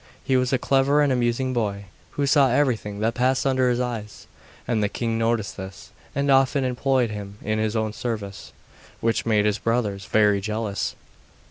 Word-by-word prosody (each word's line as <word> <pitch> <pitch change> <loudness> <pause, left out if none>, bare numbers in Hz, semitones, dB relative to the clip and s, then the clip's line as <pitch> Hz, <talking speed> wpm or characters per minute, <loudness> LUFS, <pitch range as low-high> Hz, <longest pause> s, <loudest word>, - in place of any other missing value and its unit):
He 130 - +1
was 125 -1 +2
a 130 - +3
clever 140 +3 +3
and 140 -2 +2
amusing 125 +1 0
boy, 100 -4 -2 0.3
who 145 - +1
saw 140 -1 +4
everything 115 -6 0
that 115 +2 +1
passed 130 +1 +1
under 130 -2 +2
his 120 0 0
eyes, 115 -4 -4 0.4
and 115 -3 +1
the 105 - +1
king 115 0 -2
noticed 115 -2 0
this, 95 +2 -9 0.2
and 140 0 +1
often 135 +1 +3
employed 130 -1 +1
him 100 -1 -7
in 110 +1 -1
his 110 0 -1
own 110 -1 -1
service, 105 -5 -5 0.5
which 115 0 0
made 105 -2 +3
his 105 0 +1
brothers 105 -4 -1
very 105 -2 +3
jealous. 105 0 -2
115 Hz, 175 wpm, -24 LUFS, 105-130 Hz, 0.5 s, saw